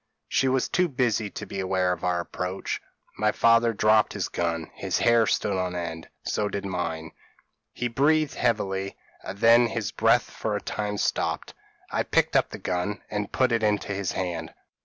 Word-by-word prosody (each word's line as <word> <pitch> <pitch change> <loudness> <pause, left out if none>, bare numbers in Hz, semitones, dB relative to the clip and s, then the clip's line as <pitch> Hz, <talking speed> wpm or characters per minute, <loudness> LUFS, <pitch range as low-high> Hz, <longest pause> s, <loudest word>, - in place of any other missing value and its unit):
She 135 - +2
was 130 0 +2
too 180 -1 +2
busy 120 -7 0
to - - -7
be 100 - -6
aware 95 -1 +1
of 85 - -8
our 90 -1 +1
approach. 90 +2 -4 0.4
My 105 0 +3
father 115 +1 +4
dropped 110 0 +3
his - - -2
gun; 85 -2 -2
his - - -2
hair 115 -2 +4
stood 100 - +1
on 90 -1 -2
end, 80 -2 -5
so 105 -1 -1
did 100 -1 -4
mine; 80 -4 -3 0.6
he 125 - -2
breathed 150 +5 +2
heavily, 100 -5 -1 0.2
and 100 - -7
then 115 +3 +6
his 110 -3 -3
breath - - +3
for - - -2
a - - -1
time 105 -1 -3
stopped. - - -1 0.4
I - - +1
picked - - +1
up - - +3
the - - -7
gun 90 +3 -2
and 105 -1 -3
put 130 -1 +2
it 115 -1 +2
into 105 -1 0
his 100 -1 -2
hand. 85 -3 -4
105 Hz, 180 wpm, -26 LUFS, 90-115 Hz, 0.6 s, then